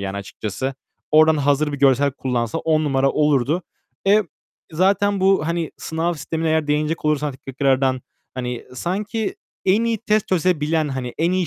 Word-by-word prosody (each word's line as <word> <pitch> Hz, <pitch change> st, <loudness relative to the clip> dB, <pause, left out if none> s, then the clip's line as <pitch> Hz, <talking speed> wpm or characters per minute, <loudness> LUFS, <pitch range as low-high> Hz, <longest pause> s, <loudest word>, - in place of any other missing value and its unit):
yani 100 Hz, 0 st, -4 dB
açıkçası. 105 Hz, +6 st, -4 dB, 0.4 s
Oradan 155 Hz, +1 st, +6 dB
hazır 145 Hz, +1 st, +1 dB
bir 145 Hz, -, -4 dB
görsel 140 Hz, +1 st, +4 dB
kullansa 125 Hz, -4 st, -2 dB
10 155 Hz, -1 st, +1 dB
numara 135 Hz, -1 st, +2 dB
olurdu. 150 Hz, +3 st, +1 dB, 0.4 s
Eee, 205 Hz, +2 st, +5 dB, 0.5 s
zaten 195 Hz, +3 st, +2 dB
bu, 190 Hz, -5 st, +3 dB
hani, 170 Hz, -1 st, -1 dB
sınav 165 Hz, +2 st, -2 dB
sistemine 160 Hz, +1 st, -3 dB
eğer 160 Hz, -1 st, +1 dB
değinecek 150 Hz, +2 st, -1 dB
olursan 150 Hz, -2 st, 0 dB
tekrardan, 135 Hz, -1 st, +1 dB, 0.3 s
hani, 125 Hz, -1 st, -4 dB
sanki 205 Hz, -, -2 dB, 0.3 s
en 205 Hz, +5 st, +3 dB
iyi 230 Hz, -1 st, 0 dB
test 215 Hz, -1 st, 0 dB
çözebilen, 160 Hz, -4 st, +1 dB
hani, 130 Hz, -3 st, -4 dB
en 170 Hz, +2 st, +2 dB
iyi 185 Hz, -1 st, +1 dB
155 Hz, 150 wpm, -21 LUFS, 135-175 Hz, 0.5 s, Oradan